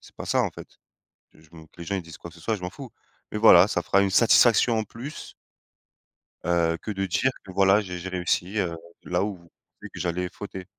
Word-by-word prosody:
c'est - - -19
pas - - -7
ça, - - +2
en - - -1
fait, - - -11 0.6
que 80 - -22
je 80 - -23
me 80 -2 -13
que 80 - -29
les 85 - -6
gens, 100 - -3
ils - - -2
disent 85 -1 -12
quoi 85 - -10
que 85 - -19
ce - - -16
soit 110 -2 -1
je 90 - -13
m'en 90 - -4
fous, 135 +4 -10 0.4
mais - - -3
voilà 100 -4 +7
ça 85 - -1
fera 100 - +2
une 100 - +1
satisfaction 115 +1 +4
en 110 - -1
plus. 125 +8 -9 1.1
Heu, 85 -1 +1
que 110 - -5
de 95 -1 -2
dire 130 +8 +1
que, 95 - -10
voilà, 95 +2 +4
j'ai 90 -3 -6
j'ai 95 +2 -6
réussi, 90 +2 -1
heu, 85 -3 -1 0.3
là 90 +2 -1
où 100 -3 -4 0.4
j'ai - - -11
vu - - -17
que - - -8
j'allais 90 +1 -2
fauter. 95 -2 -8
95 Hz, 250 wpm, -25 LUFS, 85-105 Hz, 1.1 s, voilà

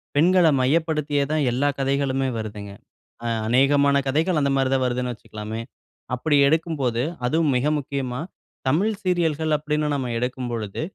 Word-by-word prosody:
பெண்கள 175 +4 +4 0.2
மையப்படுத்தியே 150 0 +1
தான், 155 -1 +1
எல்லா 130 +4 +1
கதைகளுமே 135 -1 0
வருதுங்க. 105 -2 -6 0.5
அ - - -1 0.2
அநேகமான 140 +3 +4
கதைகள் 155 +4 +1
அந்தமாரி 135 -2 +1
தான் 130 -1 +2
வருதுன்னு 125 0 -1
வச்சுக்கலாமே! 110 0 -7 0.5
அப்பிடி 145 +4 +1
எடுக்கும்போது, 140 -6 0 0.2
அதுவும் 155 +2 +2
மிக 125 - -1
முக்கியமா, 135 -2 -3 0.5
தமிழ் 195 +10 +1
சீரியல்கள் 160 -4 +1
அப்பிடீன்னு 150 0 -1
நம்ம 130 -3 -2
எடுக்கும்பொழுது, 120 -4 -3
140 Hz, 125 wpm, -23 LUFS, 125-155 Hz, 0.5 s, பெண்கள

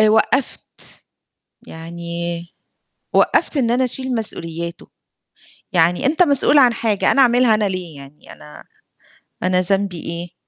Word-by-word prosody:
آآ، 215 - +5
وقّفت، 225 +5 -1 0.6
يعني 170 +1 -6 0.7
وقّفت - - +2
إن 235 -4 +1
أنا 250 +2 +1
أشيل 260 0 -3
مسؤولياته، 170 -6 -5 0.9
يعني 175 +5 +2
أنت 315 +6 +3
مسؤول 290 -1 +3
عن 250 -4 +5
حاجة 220 -3 +1
أنا 275 - +3
أعملها 245 -2 +4
أنا 215 - -1
ليه، 180 -4 -6
يعني 140 +2 -14
أنا 75 +1 -14 0.8
أنا 185 0 +1
ذنبي 190 -1 +1
إيه 170 +1 -6
185 Hz, 125 wpm, -18 LUFS, 170-245 Hz, 0.9 s, آآ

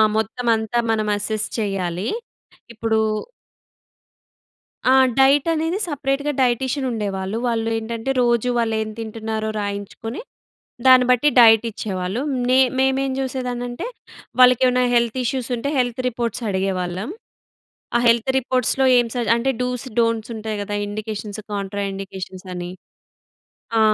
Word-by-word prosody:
మొత్తమంతా 225 +1 0
మనం 215 -1 0
అసెస్ 215 +1 -2
చేయాలి. 195 -3 -2 0.7
ఇప్పుడు 225 -1 0 1.9
ఆ! - - +6 0.3
డైట్ 270 +1 +5
అనేది 325 +3 -1
సపరేట్‌గా 285 -1 -1
డైటీషియన్ 260 +2 0
ఉండేవాళ్ళు. 200 -2 -3
వాళ్ళు 225 -1 0
ఏంటంటే, 225 +2 -4
రోజు 240 0 +2
వాళ్ళు 225 -1 +1
ఏం 215 - -3
తింటున్నారో 220 -1 -4
రాయించుకొని, 205 - -5 0.7
దాన్ని 255 -1 +8
బట్టి 250 +4 +4
డైట్ 225 -1 +7
ఇచ్చేవాళ్ళు. 195 +1 -3 0.3
నే 255 +1 +5 0.2
మేమేం 265 0 +2
చూసేదాన్నంటే, 250 - -3 0.5
వాళ్ళకి 250 -1 +7
ఏమన్నా 250 0 +2
హెల్త్ 235 +1 +2
ఇష్యూస్ 250 0 -2
ఉంటే, 280 +5 -2
హెల్త్ 245 0 0
రిపోర్ట్స్ 235 -1 -3
అడిగేవాళ్ళం. 190 - -2 0.9
ఆ - - +2
హెల్త్ 230 +2 +3
రిపోర్ట్స్‌లో 260 +1 +1
ఏం 240 -1 +3
సజ 240 -1 -1
అంటే 245 +3 0
డూస్, 250 0 -2 0.2
డోంట్స్ 230 -1 0
ఉంటాయి 215 -1 -4
గదా! 205 0 -4
ఇండికేషన్స్, 215 0 -5
కాంట్రా 200 0 -3
ఇండికేషన్స్ 190 -1 -7
అని. 175 0 -5 1.1
ఆ! - - +4
230 Hz, 120 wpm, -21 LUFS, 210-250 Hz, 1.9 s, దాన్ని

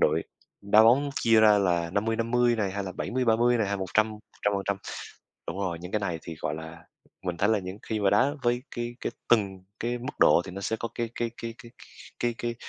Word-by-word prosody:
đội 80 +2 +3 0.4
đá 105 +2 +5
bóng 135 +5 +5
chia 115 -1 +5
ra 105 -1 +6
là 85 -4 +1
50:50 115 +4 +1
này, 100 -3 0
hay 100 0 -3
là 95 - -5
70:30 120 +2 +2
này, 110 - +1
hay 100 - 0
100, 100 +3 +1
100%. 100 -2 -2 0.7
Đúng 85 - -4
rồi, 90 -4 -2
những 90 +1 -8
cái 105 - +1
này 90 -5 -2
thì 80 - -7
gọi 75 - -2
là 80 +1 -9 0.4
mình 90 -2 -3
thấy 100 +5 +2
là 110 -1 +3
những 95 +1 -7
khi 110 -1 -3
mà 100 -1 +3
đá 120 +8 +3
với 120 +1 +1
cái 120 0 -4
cái - - -3 0.2
từng 100 -5 +2 0.2
cái 120 +1 -1
mức 130 +4 -7
độ 85 - +6
thì - - -7
nó 95 +2 -7
sẽ 110 +3 -1
có 115 - -4
cái 115 -1 -2
cái 120 -1 -2
cái 115 0 -4
cái 115 - -13 0.5
cái 120 -1 0
cái 120 0 -2
105 Hz, 220 wpm, -27 LUFS, 95-115 Hz, 0.7 s, ra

